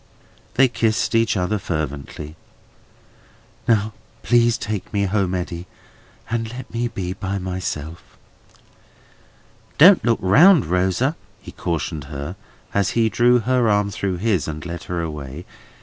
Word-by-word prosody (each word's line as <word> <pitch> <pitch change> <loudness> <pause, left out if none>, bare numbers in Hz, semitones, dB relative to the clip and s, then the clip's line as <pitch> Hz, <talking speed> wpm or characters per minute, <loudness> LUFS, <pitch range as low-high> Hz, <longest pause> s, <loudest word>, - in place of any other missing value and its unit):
They 135 +1 +6
kissed 115 -2 0
each 115 -2 +2
other 95 +3 0
fervently. 75 -2 -5 1.3
"Now, 110 -2 +2 0.3
please 120 -1 +3
take 105 -3 -4
me 100 -1 0
home, 95 -2 0
Eddy, 90 0 -4 0.6
and 115 -1 -2
let 125 -1 -9
me 120 +1 0
be 95 -6 -4
by 95 +1 -4
myself." 90 -4 -5 1.6
"Don't 180 +5 +8
look 115 -1 +2
round, 150 - +6
Rosa," 95 - +1 0.2
he - - -11
cautioned 80 -3 -3
her, 70 +4 -6 0.4
as 100 -2 +2
he 115 -1 +3
drew 120 +1 +4
her 125 -1 +2
arm 105 -1 +2
through 95 -1 -2
his, 100 -3 0
and 75 0 -6
led 85 0 -6
her 85 -1 -3
away. 75 0 -6
100 Hz, 135 wpm, -21 LUFS, 85-115 Hz, 1.6 s, Don't